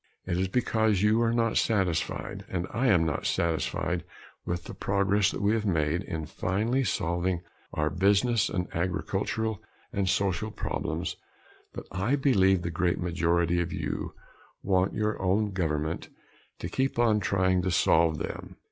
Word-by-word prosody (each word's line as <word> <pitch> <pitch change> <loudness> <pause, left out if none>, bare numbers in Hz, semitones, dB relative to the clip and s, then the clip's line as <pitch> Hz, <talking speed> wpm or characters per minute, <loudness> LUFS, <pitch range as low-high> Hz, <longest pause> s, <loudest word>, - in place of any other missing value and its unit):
It 90 - -1
is 95 - +1
because 110 -2 +1
you 110 +2 +4
are 115 -1 +2
not 115 -1 +1
satisfied, 95 -7 0
and 90 -1 -2
I 125 +3 +1
am 90 -8 +4
not 80 -3 -1
satisfied, 85 -2 0 0.4
with 85 0 -2
the - - -8
progress 100 +1 +2
that - - -4
we 105 +2 +3
have 110 -2 0
made 85 -3 +1
in 80 -4 -4
finally 110 - 0
solving 90 -4 -1 0.3
our 75 0 0
business 100 +5 +3
and 90 -1 -2
agricultural 95 +5 -1 0.3
and 100 -2 0
social 100 +2 0
problems - - -3 0.6
that - - -7
I 95 +9 +1
believe 95 -10 +3
the 85 - -2
great 85 +1 +1
majority 85 0 +1
of 85 - -3
you - - -4 0.5
want 95 -1 +1
your 105 0 -1
own 100 +3 +1
government 80 -4 -2 0.5
to - - -5
keep 130 +9 -1
on 115 -3 +4
trying 95 -1 +2
to 95 - -1
solve 80 -2 +3
them. - - -6
95 Hz, 155 wpm, -28 LUFS, 85-105 Hz, 0.6 s, you